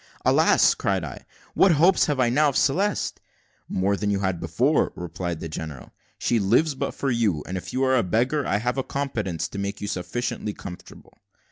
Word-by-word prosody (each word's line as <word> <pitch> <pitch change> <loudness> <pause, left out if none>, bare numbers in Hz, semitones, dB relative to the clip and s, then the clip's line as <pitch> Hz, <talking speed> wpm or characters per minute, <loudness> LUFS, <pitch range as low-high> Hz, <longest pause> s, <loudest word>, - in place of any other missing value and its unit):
"Alas!" - - +5
cried - - -1
I, - - -8 0.3
"what 190 -3 +5
hopes 175 +6 +4
have 145 -4 -1
I 125 -2 +3
now 145 +5 +3
of 135 - -1
Celeste?" 195 +9 0 0.5
"More 100 +2 +1
than 105 +1 -2
you 100 -1 0
had 95 -3 -1
before," 120 - +1
replied 85 -1 -4
the - - -4
general. 75 -4 -7 0.3
"She 120 - +1
lives 120 +10 +3
but 135 +1 -4
for 135 - -1
you; 105 -10 +1
and 95 - -5
if 90 - -5
you 130 - 0
are 130 0 +3
a 125 - +4
beggar, 125 - +1
I 100 - +1
have 125 +5 -1
a - - -1
competence 110 - -3
to 100 - -6
make 100 0 -3
you 105 - -4
sufficiently 105 +3 -3
comfortable." 90 -2 -11
115 Hz, 200 wpm, -24 LUFS, 95-135 Hz, 0.5 s, Alas